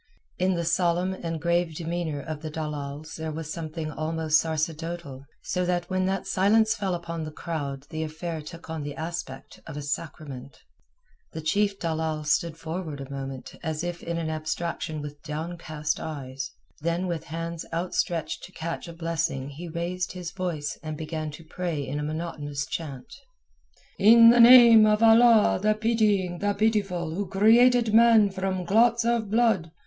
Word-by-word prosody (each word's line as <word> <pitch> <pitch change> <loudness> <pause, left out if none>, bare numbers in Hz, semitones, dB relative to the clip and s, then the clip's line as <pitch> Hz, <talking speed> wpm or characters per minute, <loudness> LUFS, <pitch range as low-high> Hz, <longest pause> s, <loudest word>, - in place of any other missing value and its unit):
In 185 0 +2
the 170 0 -2
solemn 175 +2 +1
and 165 -3 -4
grave 170 0 0
demeanour 165 -3 -3
of 155 0 -6
the 155 - -5
dalals 150 -1 -5
there 160 0 -4
was 160 0 -5
something 160 -1 -5
almost 160 0 +1
sacerdotal, 160 -3 -4 0.2
so 180 - -1
that 175 0 -1
when 185 0 +1
that 195 0 -1
silence 210 +3 +3
fell 195 -4 -2
upon 170 -1 -5
the 155 - -5
crowd 145 -4 -5
the 155 - -3
affair 160 +1 -4
took 165 +2 -11
on 160 -1 -4
the 145 0 -5
aspect 160 -4 -6
of 155 -2 -7
a - - -4
sacrament. 145 -3 -6 0.8
The 160 - -5
chief 200 +5 +1
dalal 160 -2 -2
stood 160 +2 0
forward 160 -2 -5
a 135 0 -8
moment 135 -1 -6
as 160 -1 -3
if 175 0 -4
in 170 0 -3
an 165 -1 -2
abstraction 155 -1 -3
with 145 0 -8
downcast 155 0 -4
eyes; 135 -3 -5 0.3
then 170 +3 -1
with 170 -4 -3
hands 165 +1 -5
outstretched 170 -1 -2
to - - -14
catch 165 +2 -5
a 170 - -8
blessing 165 -5 -2
he 160 +5 -8
raised 175 +2 -3
his 180 -2 -6
voice 175 -6 -4
and 155 -1 -5
began 155 0 -4
to 160 +3 -10
pray 160 -3 -3
in 145 +2 -3
a - - -3
monotonous 150 -2 -4
chant: 135 -4 -6 0.9
"In 230 +2 +8
the 240 - +4
name 235 -2 +9
of 210 +1 +3
Allah 225 -2 +6
the 215 +1 +3
Pitying 210 -5 +1
the 205 0 0
Pitiful 200 -6 0
Who 200 +3 -3
created 230 +4 +4
man 225 -3 +6
from 190 -1 -2
clots 230 +4 +3
of 235 -3 +1
blood! 220 -7 +2
170 Hz, 165 wpm, -26 LUFS, 155-190 Hz, 0.9 s, name